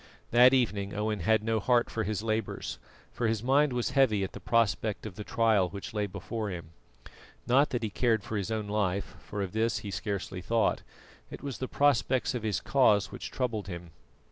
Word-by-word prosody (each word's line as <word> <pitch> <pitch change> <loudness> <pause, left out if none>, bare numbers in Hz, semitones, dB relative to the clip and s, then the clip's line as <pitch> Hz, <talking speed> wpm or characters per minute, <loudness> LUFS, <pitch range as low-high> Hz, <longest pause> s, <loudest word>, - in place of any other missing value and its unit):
That 125 +2 +7
evening 105 -6 0
Owen 105 0 -1
had 110 +4 +2
no 115 0 +1
heart 120 +2 +3
for 110 - -1
his 105 0 -2
labours, 110 0 -2 0.3
for 120 - -1
his 110 -1 -1
mind 140 +3 +3
was 125 +1 -1
heavy 130 -7 +3
at 95 - -3
the - - -7
prospect 110 -2 +1
of 110 - -6
the 105 - -7
trial 110 -5 +2
which 100 +2 -7
lay 105 -1 -1
before 100 +3 -4
him. 85 -4 -7 0.7
Not 135 +4 +4
that 120 -2 -2
he 110 - -2
cared 110 -2 +1
for 110 - -5
his 100 -1 -2
own 110 -2 -2
life, 100 -2 -1
for 105 -1 -4
of 95 - -5
this 110 0 +1
he 100 - -4
scarcely 95 -2 -4
thought; 115 +5 +1 0.5
it - - -9
was 140 -3 -5
the 130 - -2
prospects 130 -3 +2
of 125 - -3
his 105 -4 -1
cause 105 -7 +3
which - - -6
troubled 115 -6 -2
him. 85 -2 -7
110 Hz, 200 wpm, -29 LUFS, 100-120 Hz, 0.7 s, That